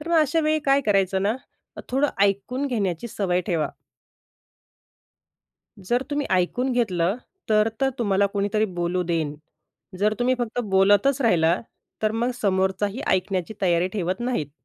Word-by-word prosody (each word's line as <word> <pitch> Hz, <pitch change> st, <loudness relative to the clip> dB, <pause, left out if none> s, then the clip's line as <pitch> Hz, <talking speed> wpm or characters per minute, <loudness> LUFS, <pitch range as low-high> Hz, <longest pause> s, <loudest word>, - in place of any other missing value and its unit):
तर 310 Hz, -, -8 dB
मग 340 Hz, -, +3 dB
अशा 310 Hz, +1 st, +2 dB
वेळी 310 Hz, 0 st, +2 dB
काय 275 Hz, 0 st, +5 dB
करायचं 195 Hz, -2 st, +2 dB
ना, 205 Hz, +3 st, +1 dB, 0.5 s
थोडं 270 Hz, +3 st, +2 dB
ऐकून 200 Hz, +8 st, 0 dB
घेण्याची 205 Hz, -4 st, -2 dB
सवय 180 Hz, -4 st, 0 dB
ठेवा. 165 Hz, -4 st, 0 dB, 2.1 s
जर 240 Hz, +7 st, 0 dB
तुम्ही 290 Hz, 0 st, -1 dB
ऐकून 245 Hz, +8 st, +1 dB
घेतलं, 195 Hz, -6 st, +1 dB, 0.3 s
तर 215 Hz, 0 st, +4 dB
तर 270 Hz, 0 st, +3 dB
तुम्हाला 200 Hz, -3 st, +2 dB
कोणीतरी 205 Hz, +1 st, +1 dB
बोलू 175 Hz, +1 st, -1 dB
देईन. 165 Hz, -4 st, -1 dB, 0.6 s
जर 210 Hz, +2 st, +2 dB
तुम्ही 250 Hz, +1 st, +2 dB
फक्त 240 Hz, 0 st, -2 dB
बोलतच 205 Hz, +8 st, +4 dB
राहिला, 175 Hz, -6 st, +3 dB, 0.4 s
तर 215 Hz, 0 st, +2 dB
मग 235 Hz, +2 st, 0 dB
समोरचाही 190 Hz, +3 st, 0 dB
ऐकण्याची 185 Hz, +1 st, -1 dB
तयारी 175 Hz, 0 st, +2 dB
ठेवत 185 Hz, -1 st, -2 dB
नाहीत. 240 Hz, -, -2 dB
205 Hz, 140 wpm, -24 LUFS, 185-245 Hz, 2.1 s, काय